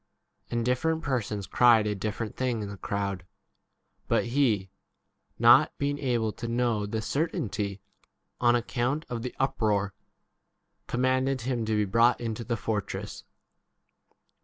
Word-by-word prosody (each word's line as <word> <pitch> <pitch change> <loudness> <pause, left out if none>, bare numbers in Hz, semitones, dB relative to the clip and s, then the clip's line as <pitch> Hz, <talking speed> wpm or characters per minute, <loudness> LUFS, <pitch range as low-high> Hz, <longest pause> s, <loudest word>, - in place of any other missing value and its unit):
And 120 -1 -1
different 160 +6 0
persons 110 -7 -2
cried 115 +2 +5
a 105 - 0
different 105 +2 -4
thing 125 -4 -1
in 100 - -5
the 100 - -7
crowd. 100 -2 -3 0.8
But - - +2
he, 115 -7 +1 0.7
not - - +6
being 145 0 -1
able 120 -5 0
to 115 +2 -6
know 115 -3 0
the 110 +1 -3
certainty 105 - -2 0.6
on 120 0 +4
account 125 +5 -1
of 120 -2 -3
the 125 +1 -5
uproar, 105 -6 +1 0.9
commanded 130 +1 +1
him 120 -1 -1
to 110 - -1
be 105 0 +2
35 95 - -5
brought 115 +2 +4
into 115 -1 -4
the 115 +1 -2
fortress. 105 -1 -4
115 Hz, 135 wpm, -28 LUFS, 105-125 Hz, 0.9 s, not